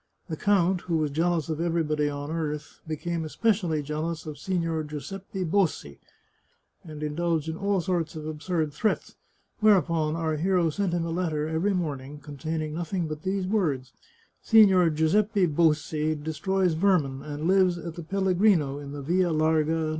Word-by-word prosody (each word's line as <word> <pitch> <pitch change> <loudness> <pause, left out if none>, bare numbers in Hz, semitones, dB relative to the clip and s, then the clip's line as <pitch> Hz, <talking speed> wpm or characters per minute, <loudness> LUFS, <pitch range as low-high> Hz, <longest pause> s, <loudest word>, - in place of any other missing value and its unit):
The 160 - -2
count, 190 -1 +2
who 170 -2 -1
was 155 -2 0
jealous 165 +1 0
of 160 0 -3
everybody 155 -3 0
on 145 +1 -5
earth, 150 -2 -4
became 165 +2 -3
especially 175 -2 0
jealous 155 +2 -3
of 150 -2 -7
Signor 165 -2 -1
Giuseppe 185 +6 -6
Bossi, 165 - 0 0.8
and 155 -2 -8
indulged 160 +1 -1
in 160 - -3
all 200 +1 0
sorts 170 -3 -1
of 155 -1 -6
absurd 155 0 -2
threats, 215 +8 -1 0.5
whereupon 170 -7 +3
our 160 -2 -1
hero 175 0 +2
sent 190 +1 -1
him 170 -1 0
a 165 - -3
letter 160 -3 -1
every 165 +5 0
morn 150 -7 -2
ing 140 +3 -10
containing 150 +1 -4
nothing 170 +1 -2
but 155 -1 -6
these 190 0 -1
words: 150 - -1 0.3
" - - -37
Sigtior 195 -6 +6
Giuseppe 195 +6 +2
Bossi 155 -1 +1
destroys 175 +4 0
vermin, 160 -7 +1
and 150 +2 -4
lives 185 -2 +4
at 170 0 -6
the 170 - -7
Pellegrino, 180 -4 +2
in 140 -1 -8
the 145 -1 -6
Via 175 +4 +2
Larga, 155 0 +2
No. 160 -1 -1
165 Hz, 165 wpm, -26 LUFS, 150-180 Hz, 0.8 s, Sigtior